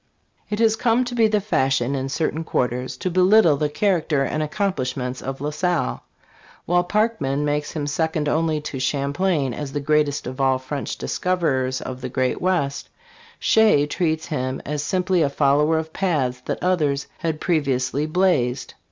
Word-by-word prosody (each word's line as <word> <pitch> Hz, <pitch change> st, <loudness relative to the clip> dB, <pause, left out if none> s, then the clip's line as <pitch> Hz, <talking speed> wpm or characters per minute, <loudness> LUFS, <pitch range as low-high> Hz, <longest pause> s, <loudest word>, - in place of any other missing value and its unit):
IT 210 Hz, -, -2 dB
HAS 225 Hz, 0 st, +3 dB
come 240 Hz, +2 st, +2 dB
to 245 Hz, -, -5 dB
be 230 Hz, -2 st, +4 dB
the 210 Hz, -1 st, +2 dB
fashion 135 Hz, -, +1 dB
in 135 Hz, -1 st, -2 dB
certain 155 Hz, +3 st, -1 dB
quarters 125 Hz, -4 st, -2 dB
to 185 Hz, -, -2 dB
belittle 185 Hz, -2 st, +5 dB
the 150 Hz, +1 st, -1 dB
character 160 Hz, -5 st, +1 dB
and 150 Hz, +3 st, -2 dB
accomplishments 130 Hz, -8 st, -2 dB
of 135 Hz, 0 st, -5 dB
La 150 Hz, +1 st, -2 dB
Salle. 170 Hz, -, -1 dB, 0.6 s
While 175 Hz, +1 st, +2 dB
Parkman 175 Hz, -10 st, 0 dB
makes 145 Hz, 0 st, -1 dB
him 150 Hz, -3 st, -3 dB
second 155 Hz, +1 st, -1 dB
only 160 Hz, 0 st, +1 dB
to 145 Hz, -3 st, -5 dB
Champlain 140 Hz, +1 st, 0 dB
as 140 Hz, +1 st, -6 dB
the 145 Hz, -, -1 dB
greatest 150 Hz, 0 st, +1 dB
of 130 Hz, +2 st, -5 dB
all 135 Hz, -1 st, +3 dB
French 130 Hz, +2 st, -5 dB
discoverers 135 Hz, -8 st, -1 dB
of 130 Hz, 0 st, -6 dB
the 125 Hz, -, -4 dB
great 130 Hz, 0 st, -1 dB
west, 170 Hz, -7 st, -1 dB, 0.5 s
Shea 215 Hz, -10 st, +4 dB
treats 160 Hz, 0 st, -1 dB
him 130 Hz, -4 st, -3 dB
as 150 Hz, 0 st, -2 dB
simply 180 Hz, +3 st, +1 dB
a 145 Hz, -, +2 dB
follower 150 Hz, +3 st, +2 dB
of 160 Hz, 0 st, -4 dB
paths 135 Hz, -10 st, -1 dB
that -, -, -3 dB
others 150 Hz, -6 st, +1 dB
had 160 Hz, -3 st, -2 dB
previously 145 Hz, -3 st, 0 dB
blazed. 155 Hz, -7 st, +1 dB
150 Hz, 165 wpm, -22 LUFS, 135-180 Hz, 0.6 s, belittle